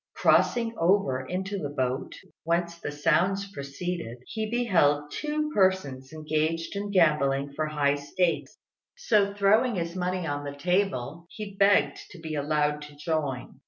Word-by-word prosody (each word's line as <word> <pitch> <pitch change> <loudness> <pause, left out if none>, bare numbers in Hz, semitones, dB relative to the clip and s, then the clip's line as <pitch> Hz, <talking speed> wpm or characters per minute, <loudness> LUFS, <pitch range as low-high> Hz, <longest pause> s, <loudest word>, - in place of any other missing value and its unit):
Crossing 230 -1 +3
over 165 -7 +2
into 190 +2 -3
the 145 - -3
boat 130 -2 -2 0.3
whence 170 +1 -1
the 145 - -4
sounds 170 +7 +1
proceeded, 140 - -5
he 220 -1 -4
beheld 150 -12 +2
two 300 0 -2
persons 170 -10 +1
engaged 155 +2 -2
in 205 +1 -3
gambling 145 -6 +2
for 155 +1 -1
high 145 -2 +1
stakes; 145 0 -1 0.4
so 210 - +2
throwing 210 +4 +3
his 170 -1 -3
money 180 -1 -2
on 145 -2 -3
the 145 0 -6
table, 170 -3 -1
he 210 -2 -7
begged 195 -8 +3
to 185 - -12
be 160 -1 -6
allowed 150 0 0
to 150 0 -11
join. 145 -4 -3
165 Hz, 145 wpm, -27 LUFS, 145-195 Hz, 0.4 s, Crossing